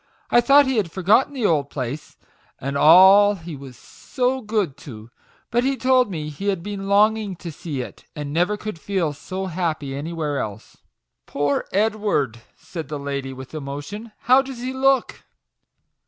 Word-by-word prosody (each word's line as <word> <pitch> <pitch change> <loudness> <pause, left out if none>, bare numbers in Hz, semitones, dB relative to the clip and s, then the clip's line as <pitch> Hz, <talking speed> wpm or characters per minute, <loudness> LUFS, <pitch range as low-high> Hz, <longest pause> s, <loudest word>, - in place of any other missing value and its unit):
I 240 - +6
thought 280 +3 +6
he 265 -2 0
had 200 -6 0
forgotten 210 +11 +2
the 245 -5 -1
old 145 -6 +1
place, 135 +2 -6 0.4
and 140 +2 -4
all 190 +7 +7
he 165 -3 -8
was 135 -3 -11
so 260 0 -3
good 210 - -1
to; 115 -5 -11 0.4
but 240 +1 +2
he 270 +1 0
told 255 -2 +3
me 155 -5 -4
he 150 +7 -6
had 190 -4 0
been 200 -1 -5
longing 210 0 +3
to 170 0 -8
see 150 -3 -5
it, - - -10
and 145 -2 -5
never 180 +6 +1
could 215 -5 -6
feel 175 -5 -1
so 185 +6 -6
happy 160 -6 -3
anywhere 150 0 -3
else." 110 -3 -7 0.2
" - - -59
Poor 145 0 -1
Edward 205 - 0
I" - - -18
said 165 -5 -8
the 150 +1 -4
lady, 140 -1 -4
with 130 +1 -10
emotion. 155 +10 -7
"How 255 +3 +5
does 270 -2 -8
he 255 +1 -3
look?" 270 -1 +1
175 Hz, 175 wpm, -22 LUFS, 145-215 Hz, 0.4 s, all